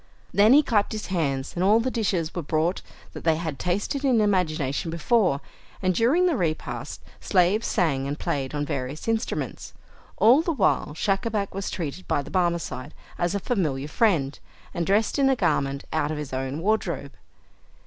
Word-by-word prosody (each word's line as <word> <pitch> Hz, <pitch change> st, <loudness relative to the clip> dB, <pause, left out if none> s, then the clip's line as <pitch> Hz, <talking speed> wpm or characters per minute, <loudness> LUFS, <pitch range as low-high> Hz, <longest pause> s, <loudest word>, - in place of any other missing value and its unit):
Then 210 Hz, +4 st, +6 dB
he 295 Hz, +2 st, +7 dB
clapped 210 Hz, -6 st, +1 dB
his 215 Hz, -, -4 dB
hands, 140 Hz, -6 st, -1 dB
and 175 Hz, -, -1 dB
all 210 Hz, +4 st, +5 dB
the 255 Hz, +3 st, -1 dB
dishes 185 Hz, -8 st, -1 dB
were 175 Hz, -, -3 dB
brought 160 Hz, +4 st, 0 dB, 0.3 s
that -, -, -8 dB
they 160 Hz, -1 st, +3 dB
had 160 Hz, -4 st, -4 dB
tasted 205 Hz, +10 st, -1 dB
in 255 Hz, -5 st, +3 dB
imagination 165 Hz, -8 st, 0 dB
before 170 Hz, -, +1 dB, 0.4 s
and 185 Hz, -1 st, +1 dB
during 265 Hz, -, +3 dB
the 350 Hz, -4 st, +2 dB
repast, 165 Hz, -7 st, -3 dB, 0.2 s
slaves 190 Hz, +3 st, +2 dB
sang 140 Hz, -6 st, +1 dB
and 145 Hz, +1 st, -3 dB
played 135 Hz, 0 st, -2 dB
on 145 Hz, 0 st, -1 dB
various 140 Hz, -, -4 dB
instruments. 225 Hz, 0 st, -3 dB, 0.4 s
All 245 Hz, +7 st, +6 dB
the 335 Hz, 0 st, -1 dB
while 195 Hz, -, +1 dB
Schacabac 200 Hz, +3 st, -1 dB
was 195 Hz, +1 st, -3 dB
treated 170 Hz, 0 st, -5 dB
by 145 Hz, -, 0 dB
the -, -, -11 dB
Barmecide 170 Hz, -6 st, -1 dB, 0.2 s
as 175 Hz, +2 st, 0 dB
a -, -, 0 dB
familiar 155 Hz, -, -1 dB
friend, 150 Hz, -7 st, +1 dB, 0.3 s
and 170 Hz, -1 st, -2 dB
dressed 210 Hz, +7 st, +2 dB
in 270 Hz, -1 st, +4 dB
a 265 Hz, -, +3 dB
garment 140 Hz, -, 0 dB
out 145 Hz, -, +1 dB
of 155 Hz, -, -3 dB
his 150 Hz, -3 st, -6 dB
own 135 Hz, +3 st, -3 dB
wardrobe. 175 Hz, -8 st, -1 dB
175 Hz, 175 wpm, -25 LUFS, 150-215 Hz, 0.4 s, he